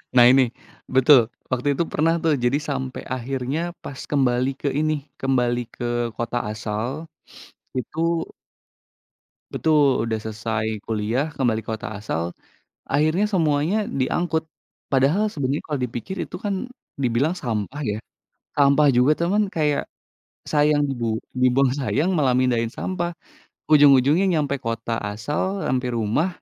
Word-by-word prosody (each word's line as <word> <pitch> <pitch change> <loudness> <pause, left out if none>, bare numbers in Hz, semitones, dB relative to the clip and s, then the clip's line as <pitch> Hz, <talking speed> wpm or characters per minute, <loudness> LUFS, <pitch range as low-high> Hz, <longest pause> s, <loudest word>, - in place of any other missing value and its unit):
Nah 120 -1 +8
ini. 135 0 +6 0.5
Betul! 130 +1 +7 0.3
Waktu 130 +2 -1
itu 170 - +1
pernah 165 +2 +2
tuh 160 -2 +3
jadi 125 +4 +3
sampai 130 -2 -3
akhirnya 130 +3 -3 0.2
pas 135 - -8
kembali 130 -2 +2
ke 145 - -1
ini, 155 0 +1 0.3
kembali 125 -2 +1 0.2
ke - - -6 0.3
kota 120 +1 -2
asal, 110 +2 -3 0.9
itu 125 - -3 1.6
Betul! 145 -7 +3
Udah 110 -1 -1
selesai 110 0 -3 0.2
kuliah, 115 +7 -1
kembali 115 -4 +1
kota 110 0 -5
asal, 85 -4 -3 0.6
akhirnya 155 +8 +2
semuanya 165 +4 +1
diangkut. 160 +5 0 0.5
Padahal 150 +11 +3
sebenarnya 140 -2 -2
kalau 150 -2 -2
dipikir 125 - -4
itu - - -16
kan 200 +3 -2 0.3
dibilang 135 +6 +1
sampah 120 +3 -3
ya. 105 0 -1 0.6
Sampah 145 +1 +5
juga 130 +5 +5
cuman 200 +3 +1
kayak 150 -3 +1 0.7
sayang 150 -1 +3
dibu 115 -4 -1 0.2
dibuang 130 +1 +3
sayang, 150 +7 +1
malah 140 -7 +2
mindahin 125 -2 +2
sampah. 175 -2 -2 0.6
Ujung-ujungnya 145 +4 +6
nyampe 140 -3 0
kota 115 -1 -3
asal, 145 - -2
nyampe 125 0 0
rumah, 115 - +1
135 Hz, 125 wpm, -23 LUFS, 120-155 Hz, 1.6 s, Nah